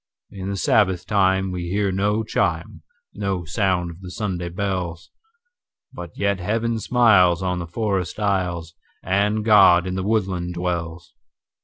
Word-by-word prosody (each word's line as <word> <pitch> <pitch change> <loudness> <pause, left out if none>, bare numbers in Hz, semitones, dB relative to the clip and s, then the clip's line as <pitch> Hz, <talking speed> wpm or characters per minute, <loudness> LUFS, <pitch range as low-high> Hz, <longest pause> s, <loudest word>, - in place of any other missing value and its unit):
In 95 -1 -6
the 100 - -3
Sabbath 95 -3 +2
time 95 -2 +1
we 90 -1 -4
hear 100 +1 0
no 105 +3 0
chime, - - -2 0.3
No 95 -3 -3
sound 90 -1 0
of 85 +3 -14
the 90 - -8
Sunday 90 -3 -4
bells; 90 -2 -4 0.8
But 85 -1 -8
yet 100 -1 0
Heaven 115 +5 -1
smiles 100 -8 +4
on 90 -1 -1
the 85 - -5
forest 95 0 -2
aisles, 90 -5 -1 0.3
And 105 +3 0
God 90 -5 +6
in 90 - -3
the 95 - -2
woodland 95 -4 -1
dwells. 85 -1 -4
95 Hz, 145 wpm, -22 LUFS, 90-100 Hz, 0.8 s, God